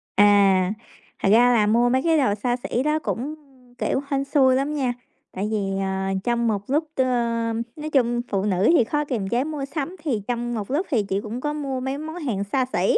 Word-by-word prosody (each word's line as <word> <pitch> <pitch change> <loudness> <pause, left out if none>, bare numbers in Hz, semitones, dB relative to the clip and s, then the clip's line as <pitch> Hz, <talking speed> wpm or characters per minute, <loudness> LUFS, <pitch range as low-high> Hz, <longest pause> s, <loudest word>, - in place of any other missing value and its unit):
À, 200 -2 +5 0.5
thật - - +2
ra 245 +2 +6
là 210 -3 +3
mua 240 +3 +3
mấy 260 +1 +2
cái 325 -1 +3
đồ 255 -8 +2
xa 240 +3 -1
xỉ 245 - -1
đó 300 +1 +1
cũng, 290 +2 -3 0.4
kiểu, 265 - 0
hên 275 -1 0
xui 270 -2 +3
lắm 275 +3 0
nha, 265 -5 0 0.4
tại 195 +3 -3
vì, 220 - +1 0.2
ờ, 190 0 -2 0.2
trong 235 0 +1
một 210 -3 0
lúc, 305 +4 +1
ờ 260 - +3 0.7
nói 310 0 -5
chung 240 -4 +2
phụ 195 0 0
nữ 190 -2 +1
thì 315 - +5
khó 295 +6 -1
kiềm 225 -9 -3
chế 240 +4 +1
mua 295 -2 -4
sắm, 300 +5 -4
thì 245 -9 -1
trong 240 0 -2
một 215 0 -4
lúc 320 +8 0
thì 225 -6 +2
chị 195 0 -2
cũng 225 +3 -5
có 295 +1 -2
mua 275 -3 -3
mấy 265 +2 -3
món 315 +2 -6
hàng 250 - -2
xa 255 +6 0
xỉ. 180 +2 +3
245 Hz, 220 wpm, -23 LUFS, 210-285 Hz, 0.7 s, ra